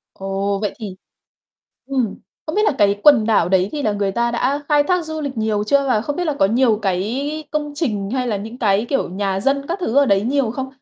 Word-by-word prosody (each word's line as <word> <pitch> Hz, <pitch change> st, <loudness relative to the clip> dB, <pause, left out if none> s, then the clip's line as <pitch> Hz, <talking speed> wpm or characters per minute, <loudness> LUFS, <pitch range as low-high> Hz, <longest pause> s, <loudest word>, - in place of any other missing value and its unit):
Ồ, 195 Hz, +1 st, -2 dB
vậy 210 Hz, -2 st, -2 dB
thì, 200 Hz, -5 st, -7 dB, 0.9 s
ừm, 255 Hz, -7 st, -1 dB, 0.3 s
không 310 Hz, -, -4 dB
biết 425 Hz, -, +3 dB
là -, -, +3 dB
cái 200 Hz, 0 st, +3 dB
quần 270 Hz, -8 st, +6 dB
đảo 210 Hz, -6 st, +3 dB
đấy 190 Hz, 0 st, +2 dB
thì 295 Hz, -, -3 dB
là 215 Hz, -, +1 dB
người 200 Hz, -1 st, -1 dB
ta 235 Hz, +2 st, 0 dB
đã 260 Hz, +4 st, 0 dB
khai 295 Hz, -1 st, +4 dB
thác 355 Hz, +3 st, 0 dB
du 315 Hz, 0 st, -4 dB
lịch 280 Hz, -3 st, -4 dB
nhiều 215 Hz, -1 st, 0 dB
chưa 280 Hz, +4 st, +2 dB
và 220 Hz, -4 st, +2 dB
không 290 Hz, +6 st, -4 dB
biết 355 Hz, -, -1 dB
là 305 Hz, -3 st, -1 dB
có 195 Hz, -, +4 dB
nhiều 230 Hz, 0 st, +2 dB
cái 250 Hz, +12 st, -2 dB
công 295 Hz, -1 st, -2 dB
trình 215 Hz, -10 st, -2 dB
hay 255 Hz, -1 st, -1 dB
là 215 Hz, -, -1 dB
những 225 Hz, +5 st, -8 dB
cái, 210 Hz, 0 st, +1 dB
kiểu, 275 Hz, -, 0 dB
nhà 195 Hz, +1 st, -2 dB
dân 275 Hz, +4 st, 0 dB
các 345 Hz, +4 st, -2 dB
thứ 260 Hz, -8 st, -2 dB
ở 285 Hz, 0 st, +5 dB
đấy 200 Hz, -4 st, +3 dB
nhiều 260 Hz, 0 st, 0 dB
không? 265 Hz, +3 st, -4 dB
235 Hz, 245 wpm, -20 LUFS, 200-285 Hz, 0.9 s, quần